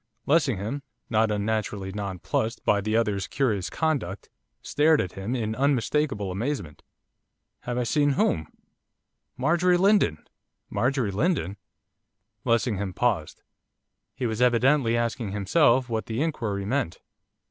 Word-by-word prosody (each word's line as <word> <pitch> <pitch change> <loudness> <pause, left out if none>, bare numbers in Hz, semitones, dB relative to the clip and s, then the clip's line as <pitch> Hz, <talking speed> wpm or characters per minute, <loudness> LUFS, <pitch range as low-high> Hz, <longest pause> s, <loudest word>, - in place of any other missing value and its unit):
Lessingham, 135 - +1 0.3
not 110 0 +3
unnaturally 105 -2 -2
nonplussed 100 +3 -3
by 100 -1 +3
the 110 +2 0
other's 105 -4 0
curious 110 -9 0
conduct, 140 - -2 0.3
stared 155 +1 +3
at 90 - -1
him 100 +6 -4
in 110 -3 -2
unmistakable 135 -5 0
amazement. 100 - -4 0.8
'Have 120 0 -4
I 125 - +1
seen 145 +4 +2
whom?' 80 - +1 0.9
'Marjorie 175 +6 +3
Lindon!' 190 - +2 0.4
'Marjorie 120 +1 0
Lindon?' 110 - 0 0.9
Lessingham 110 -5 0
paused. 105 -11 -1 0.7
He 125 - -3
was 110 0 -2
evidently 125 0 +3
asking 115 -3 -2
himself 120 - +3
what 110 -2 -3
the 115 +6 -1
inquiry 105 -11 -2
meant. 125 -5 -1
115 Hz, 115 wpm, -26 LUFS, 100-135 Hz, 0.9 s, not